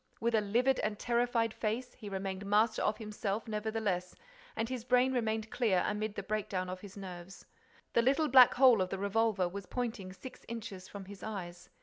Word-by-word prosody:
With 235 Hz, +1 st, 0 dB
a 220 Hz, -, +4 dB
livid 240 Hz, +6 st, +2 dB
and 210 Hz, -1 st, -1 dB
terrified 235 Hz, -1 st, +1 dB
face, 235 Hz, +3 st, -2 dB
he 215 Hz, -4 st, -9 dB
remained 190 Hz, 0 st, -4 dB
master 210 Hz, +3 st, +2 dB
of 210 Hz, -, +1 dB
himself, 210 Hz, -1 st, -3 dB
nevertheless, 210 Hz, -4 st, -2 dB, 0.4 s
and 225 Hz, 0 st, -1 dB
his 250 Hz, -2 st, -4 dB
brain 250 Hz, +1 st, +3 dB
remained 220 Hz, -3 st, -1 dB
clear 210 Hz, -7 st, +2 dB
amid 210 Hz, 0 st, -2 dB
the -, -, -4 dB
breakdown 200 Hz, -4 st, -2 dB
of 185 Hz, 0 st, -7 dB
his 200 Hz, -1 st, -11 dB
nerves. 185 Hz, -1 st, -9 dB, 0.5 s
The 235 Hz, -, +5 dB
little 275 Hz, +6 st, +3 dB
black 255 Hz, -3 st, +8 dB
hole 250 Hz, -5 st, +6 dB
of 185 Hz, -, 0 dB
the 195 Hz, -, -3 dB
revolver 200 Hz, -1 st, +1 dB
was 190 Hz, +1 st, -7 dB
pointing 230 Hz, -6 st, -3 dB
at 185 Hz, -, -11 dB
six 260 Hz, -, -11 dB
inches 205 Hz, -5 st, -7 dB
from 200 Hz, -2 st, -8 dB
his 200 Hz, 0 st, -11 dB
eyes. 175 Hz, -5 st, -6 dB
215 Hz, 195 wpm, -32 LUFS, 195-235 Hz, 0.5 s, black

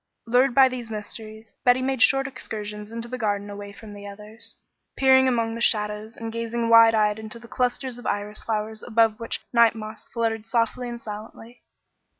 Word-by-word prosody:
Lured 245 Hz, +2 st, +3 dB
by 270 Hz, -1 st, +8 dB
these 250 Hz, -3 st, -6 dB
mysteries, 220 Hz, 0 st, -8 dB
Betty 245 Hz, 0 st, +5 dB
made 265 Hz, -2 st, -1 dB
short 270 Hz, +1 st, +4 dB
excursions 210 Hz, -5 st, -7 dB
into 230 Hz, +1 st, -5 dB
the 255 Hz, +1 st, -6 dB
garden 205 Hz, -2 st, -1 dB
away 205 Hz, 0 st, -8 dB
from 210 Hz, +1 st, -12 dB
the 205 Hz, 0 st, -9 dB
others, 210 Hz, +2 st, -10 dB, 0.4 s
peering 265 Hz, -1 st, +5 dB
among 230 Hz, -3 st, +1 dB
the 230 Hz, -, -6 dB
shadows, 210 Hz, 0 st, 0 dB
and 225 Hz, -1 st, -6 dB
gazing 230 Hz, 0 st, -2 dB
wide 230 Hz, 0 st, +8 dB
eyed 210 Hz, 0 st, +2 dB
into 220 Hz, +1 st, -7 dB
the 235 Hz, 0 st, -13 dB
clusters 250 Hz, 0 st, -2 dB
of -, -, -7 dB
iris 205 Hz, +1 st, -2 dB
flowers 220 Hz, 0 st, -3 dB
above 225 Hz, -2 st, +2 dB
which 230 Hz, -, -4 dB
night 235 Hz, -1 st, +5 dB
moths 215 Hz, 0 st, -8 dB
fluttered 225 Hz, -2 st, -2 dB
softly 235 Hz, +1 st, 0 dB
and 235 Hz, 0 st, -6 dB
silently. 225 Hz, +2 st, -9 dB
225 Hz, 180 wpm, -24 LUFS, 215-240 Hz, 0.4 s, by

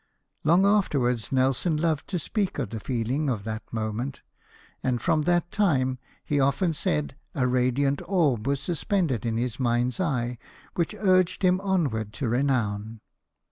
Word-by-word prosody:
'" -, -, -54 dB
Long 170 Hz, +5 st, +4 dB
afterwards 135 Hz, -, +1 dB
Nelson 135 Hz, +5 st, +2 dB
loved 155 Hz, -2 st, 0 dB
to 185 Hz, -, -2 dB
speak 195 Hz, +4 st, -2 dB
of 125 Hz, -8 st, -3 dB
the 115 Hz, -, -4 dB
feeling 130 Hz, +6 st, -1 dB
of 110 Hz, -6 st, -2 dB
that 110 Hz, +1 st, -4 dB
moment: 110 Hz, +4 st, -3 dB, 0.6 s
and 125 Hz, -2 st, 0 dB
from 155 Hz, +5 st, +2 dB
that 175 Hz, +2 st, +1 dB
time, 130 Hz, -, +1 dB, 0.3 s
he 145 Hz, -, +1 dB
often 140 Hz, +6 st, +2 dB
said, 75 Hz, -, -1 dB, 0.2 s
a 130 Hz, -, +1 dB
radiant 130 Hz, +3 st, +1 dB
orb 145 Hz, -, +1 dB
was 140 Hz, 0 st, +1 dB
suspended 160 Hz, -, -1 dB
in 115 Hz, -1 st, 0 dB
his 120 Hz, +1 st, -2 dB
mind's 120 Hz, 0 st, +1 dB
eye, 125 Hz, -9 st, -1 dB, 0.3 s
which 170 Hz, +4 st, -1 dB
urged 185 Hz, -3 st, +2 dB
him 185 Hz, 0 st, +3 dB
onward 140 Hz, -, 0 dB
to 135 Hz, -, -3 dB
renown. 115 Hz, -4 st, 0 dB
135 Hz, 155 wpm, -26 LUFS, 120-170 Hz, 0.6 s, Long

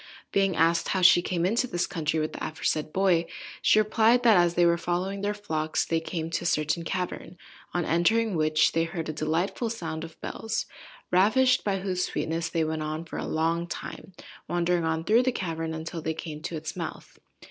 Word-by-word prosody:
Being 195 Hz, -2 st, +2 dB
asked 165 Hz, +1 st, +2 dB
how 190 Hz, -1 st, 0 dB
she 175 Hz, 0 st, +7 dB
came 175 Hz, -1 st, -1 dB
into 230 Hz, +7 st, +1 dB
this 175 Hz, -7 st, -1 dB
country 160 Hz, -1 st, -1 dB
with 155 Hz, 0 st, -2 dB
the -, -, -6 dB
aforesaid 155 Hz, -1 st, -2 dB
boy, 180 Hz, -3 st, +2 dB, 0.3 s
she -, -, +4 dB
replied, 220 Hz, +3 st, +4 dB
that, 230 Hz, -3 st, +6 dB
as 175 Hz, -1 st, +3 dB
they 175 Hz, -, +4 dB
were 170 Hz, 0 st, +4 dB
following 180 Hz, +3 st, -2 dB
their 205 Hz, +1 st, -1 dB
flocks, 155 Hz, -6 st, -1 dB
they 165 Hz, -, 0 dB
came 160 Hz, 0 st, -4 dB
to -, -, -1 dB
a -, -, -6 dB
certain 155 Hz, +1 st, +1 dB
cavern, 180 Hz, 0 st, -4 dB, 0.3 s
on 175 Hz, -2 st, -1 dB
entering 215 Hz, +7 st, +2 dB
which 155 Hz, -1 st, +3 dB
they 165 Hz, 0 st, +1 dB
heard 165 Hz, -1 st, -5 dB
a -, -, -2 dB
delightful 165 Hz, +9 st, -1 dB
sound 160 Hz, -8 st, -4 dB
of 165 Hz, -1 st, -10 dB
bells, 225 Hz, 0 st, -3 dB, 0.5 s
ravished 255 Hz, +8 st, +4 dB
by 195 Hz, -2 st, -1 dB
whose 185 Hz, -2 st, -1 dB
sweetness 165 Hz, +1 st, -2 dB
they 165 Hz, -, 0 dB
went 155 Hz, 0 st, -2 dB
on 155 Hz, +2 st, -4 dB
for -, -, -7 dB
a -, -, -4 dB
long 165 Hz, +2 st, 0 dB
time 185 Hz, -, -7 dB, 0.3 s
wandering 175 Hz, -1 st, +1 dB
on 160 Hz, 0 st, -1 dB
through 220 Hz, +7 st, +4 dB
the 255 Hz, 0 st, +1 dB
cavern, 165 Hz, -7 st, -3 dB
until 160 Hz, +1 st, -5 dB
they 160 Hz, 0 st, -2 dB
came 155 Hz, -2 st, -7 dB
to 165 Hz, -, -5 dB
its 160 Hz, +1 st, -5 dB
mouth. 170 Hz, -3 st, -7 dB
170 Hz, 200 wpm, -27 LUFS, 160-195 Hz, 0.5 s, she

